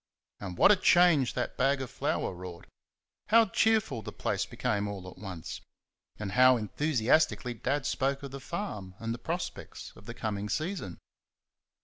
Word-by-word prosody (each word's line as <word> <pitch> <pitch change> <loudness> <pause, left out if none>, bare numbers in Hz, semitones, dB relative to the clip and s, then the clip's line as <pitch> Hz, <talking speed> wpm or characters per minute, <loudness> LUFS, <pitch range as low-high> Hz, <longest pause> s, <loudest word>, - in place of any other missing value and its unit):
And 90 -3 -6
what - - +7
a - - +7
change 175 -7 +4
that 125 - -3
bag 135 +1 +2
of 130 -2 -5
flour - - -1
wrought! 90 -1 -9 0.6
How 230 +1 +6
cheerful 215 - +2
the - - -7
place - - -2
became 105 -1 -1
all 100 -2 -6
at 90 - -11
once! 95 -5 -7 0.6
And 105 -2 -4
how 130 +3 +6
enthusiastically 125 +3 +1
Dad 135 +5 -2
spoke 135 +1 0
of 140 - -6
the 140 - -6
farm 120 - -5
and 115 +1 -3
the 120 - -7
prospects 170 +8 -5
of - - -16
the - - -6
coming 105 -1 -3
season! 155 - -3
125 Hz, 160 wpm, -30 LUFS, 100-155 Hz, 0.6 s, what